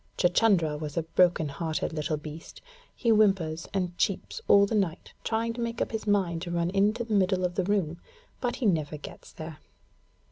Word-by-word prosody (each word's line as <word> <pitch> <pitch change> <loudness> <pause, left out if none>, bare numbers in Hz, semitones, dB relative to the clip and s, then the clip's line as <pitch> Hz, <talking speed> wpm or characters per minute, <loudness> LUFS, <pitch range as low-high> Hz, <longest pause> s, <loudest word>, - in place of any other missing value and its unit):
Chuchundra 175 -4 +3
is 150 +1 -6
a 165 - +1
broken 170 -1 +3
hearted 160 +2 -3
little 155 0 -1
beast, 155 +2 -9 0.4
He 235 - +1
whimpers 190 -7 +2
and 180 -3 -2
cheeps 460 - -1
all 200 0 +7
the 200 - -4
night, 190 -6 -1
trying 230 +1 -1
to 235 - -5
make 235 0 -3
up - - -1
his 220 -1 -4
mind 185 -5 +1
to 175 - -5
run 170 0 0
into 210 +4 +2
the 230 -2 -4
middle 185 -2 +2
of 180 - -1
the 190 - 0
room, 175 -4 0 0.4
but 245 - -1
he 255 - -3
never 155 -6 +1
gets 145 - -11
there. 155 -1 -8
180 Hz, 190 wpm, -28 LUFS, 160-210 Hz, 0.4 s, all